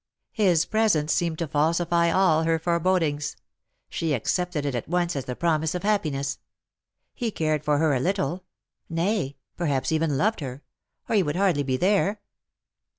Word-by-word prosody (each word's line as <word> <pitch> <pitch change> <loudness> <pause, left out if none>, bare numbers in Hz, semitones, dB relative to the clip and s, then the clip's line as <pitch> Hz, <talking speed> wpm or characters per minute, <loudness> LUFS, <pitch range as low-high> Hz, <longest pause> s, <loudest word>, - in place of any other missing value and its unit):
His 180 -6 +3
presence 205 -9 +2
seemed 170 -2 0
to 165 - -2
falsify 170 +3 +2
all 180 -4 +3
her 165 0 +2
forebodings. 165 -3 0 0.5
She 160 -3 -2
accepted 170 - -1
it 140 - -1
at 120 - -3
once 175 0 0
as 135 - -3
the 125 - -4
promise 160 0 0
of 180 - -4
happiness. 155 -10 0 0.7
He 240 -4 -2
cared 155 -6 -1
for 150 -1 +2
her 155 -1 +2
a 130 - +1
little 180 +1 -1 0.3
— - - -51
nay, 180 -9 -1 0.2
perhaps 145 -6 0
even 160 -3 +1
loved 215 +9 +1
her 135 -1 -6 0.2
— - - -50
or - - -2
he - - +5
would 150 -4 -2
hardly 185 -6 +2
be 130 -2 -1
there. 200 +4 +2
165 Hz, 170 wpm, -25 LUFS, 145-180 Hz, 0.7 s, he